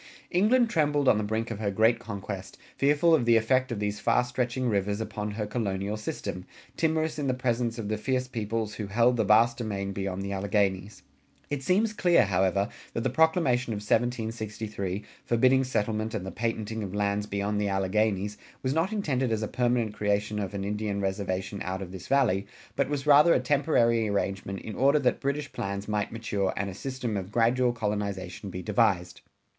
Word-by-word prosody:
England 225 +7 +4
trembled 145 - +1
on 105 - +5
the - - -1
brink 110 +2 -2
of - - -5
her 105 -2 0
great 110 +3 +3
conquest, 100 -4 -6 0.2
fearful 145 +4 +3
of 145 -7 +3
the 115 0 +5
effect 130 +3 +2
of 115 - -3
these 105 0 -2
far 125 - +3
stretching 125 +1 -2
rivers 100 -1 0
upon 105 -1 -4
her 105 +1 -3
colonial 105 -2 -2
system, 90 -3 -5 0.3
timorous 160 -1 0
in 145 - -1
the 130 - +1
presence 120 -2 -1
of 110 -3 -4
the 105 0 -2
fierce 130 +2 -1
peoples 110 -2 -3
who 105 -1 -5
held 115 +5 +3
the 115 - +2
vast 115 +3 +4
domain 100 -4 -3
beyond 95 -1 -3
the 100 - -4
Alleghanies. 100 0 -1 0.5
It 145 -2 -1
seems 205 +9 +2
clear, 175 - +4
however, 95 +1 +1 0.3
that - - -2
the - - 0
Proclamation 135 -5 +2
of - - -3
1763, 110 -3 -2 0.2
forbidding 130 +3 +3
settlement 110 -3 -1
and 95 - -3
the 95 - -5
patenting 110 -1 -3
of 100 -1 -5
lands 105 0 0
beyond 100 +1 -1
the 100 - 0
Alleghanies, 100 +1 0 0.2
was 130 0 0
not 165 +6 +1
intended 135 - 0
as 110 -1 0
a - - -1
permanent 120 -3 0
creation 105 +1 0
of 100 0 -4
an 100 - -3
Indian 105 0 -2
reservation 95 0 -2
out 95 +1 -3
of 90 - -9
this 95 -1 -9
Valley, 110 -8 +2 0.3
but 140 -1 0
was 145 -1 -2
rather 150 +3 +7
a - - +3
temporary 125 -5 +2
arrangement 100 -1 -2
in 110 - -7
order 140 +5 +4
that 130 -4 +1
British 140 0 -2
plans 100 +1 -4
might 105 -1 -1
mature 105 -4 -1
and 100 0 -2
a - - -8
system 125 +1 -4
of 95 0 -4
gradual 120 +2 +3
colonization 100 -4 -3
be 90 0 -6
devised. 100 -5 +1
110 Hz, 190 wpm, -28 LUFS, 100-125 Hz, 0.5 s, rather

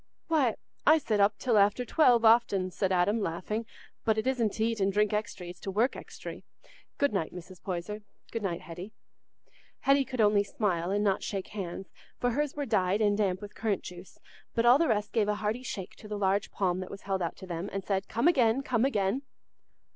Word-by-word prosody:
"Why, 285 -8 +3 0.3
I 310 +2 +6
sit 220 -9 0
up 205 +1 +4
till 230 -3 +2
after 205 +5 +3
twelve 245 -4 +4
often," 205 -5 +4
said 190 +1 -1
Adam, 185 +5 +2
laughing, 210 +6 -3 0.4
"but 220 -1 +2
it 220 - 0
isn't 250 -4 +1
t' 220 - 0
eat 225 - -4
and 195 0 +2
drink 210 +1 +2
extry, 205 -4 -3
it's 175 - -15
to - - -6
work 220 +7 +1
extry. - - -9 0.5
Good 285 -5 +2
night, 190 -5 -1
Mrs. 180 0 -10
Poyser; 190 +3 -4 0.3
good 230 - -3
night, 180 -4 -2
Hetty." 175 +6 -9 0.9
Hetty 275 0 +4
could 255 -2 -7
only 205 -1 +4
smile 185 -4 -1
and 205 +1 +1
not 195 -2 +2
shake 195 -2 -4
hands, 190 -2 -5 0.3
for 245 - +1
hers 295 +3 -1
were 290 -1 -2
dyed 195 -4 +1
and 205 -2 +3
damp 195 -2 0
with 205 - -8
currant 215 -4 -1
juice; 180 0 -10 0.4
but 230 - +2
all 245 +4 +7
the 335 - +3
rest 210 -4 0
gave 220 -3 +2
a 210 - +1
hearty 215 +3 -2
shake 195 -7 -6
to 215 - -11
the 210 0 -4
large 200 0 +1
palm 185 -2 0
that 185 - -6
was 195 - -9
held 195 -1 -1
out 170 - -2
to - - -9
them, 175 +1 -4
and 195 -1 -3
said, 195 -1 -1
"Come 235 +7 +1
again, 260 -5 +3
come 250 -2 +1
again!" 210 -1 +1
210 Hz, 215 wpm, -29 LUFS, 190-230 Hz, 0.9 s, all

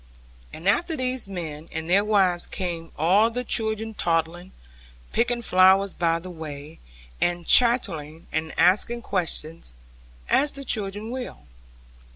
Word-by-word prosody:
And 165 +4 -7
after 320 - +1
these 255 -3 0
men 165 -5 -7
and 160 0 -5
their 195 +4 +4
wives 190 -5 +2
came 170 -4 -5
all 190 +8 +4
the 245 +2 -4
children 220 -1 0
toddling, 170 0 -2 0.6
picking 240 +1 0
flowers 190 0 +4
by 165 -1 +1
the 180 +2 -9
way, 155 -2 -9 0.4
and 175 -1 0
chattering 165 - +2
and 160 0 -2
asking 220 +6 +2
questions, 160 - -1 0.5
as 290 +1 +2
the 275 0 -8
children 210 0 -2
will. 255 -1 -6
185 Hz, 130 wpm, -24 LUFS, 165-225 Hz, 0.6 s, their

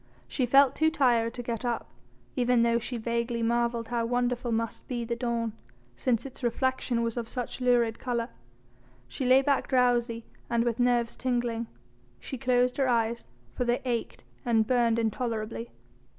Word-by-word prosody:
She 255 -3 -1
felt 275 +1 +5
too 315 0 +3
tired 240 -7 +2
to 245 - -5
get 235 -1 -3
up, 240 -2 -2 0.5
even 245 -2 +3
though 235 0 +3
she 245 +1 -5
vaguely 235 +1 -1
marvelled 235 0 0
how 240 -1 0
wonderful 245 0 0
must 230 0 -2
be 240 -2 -3
the 235 +1 -2
dawn, 235 -2 -2 0.4
since 235 - 0
its 275 - -9
reflection 245 0 0
was 230 +1 -2
of 230 -1 -3
such 250 0 -4
lurid 240 -2 +2
colour. 240 -2 -2 0.8
She 255 - -3
lay 260 +2 +6
back 280 0 +1
drowsy 240 -3 +2 0.2
and 235 0 +2
with 240 0 -1
nerves 245 -1 +2
tingling; 240 -2 -1 0.5
she 265 - -7
closed 250 -1 +2
her 270 -2 +2
eyes 235 -1 0 0.3
for - - -1
they 240 0 +1
ached 240 -2 -3 0.2
and 230 -4 +3
burned 235 -1 +2
intolerably. 220 - -2
240 Hz, 165 wpm, -28 LUFS, 230-250 Hz, 0.8 s, lay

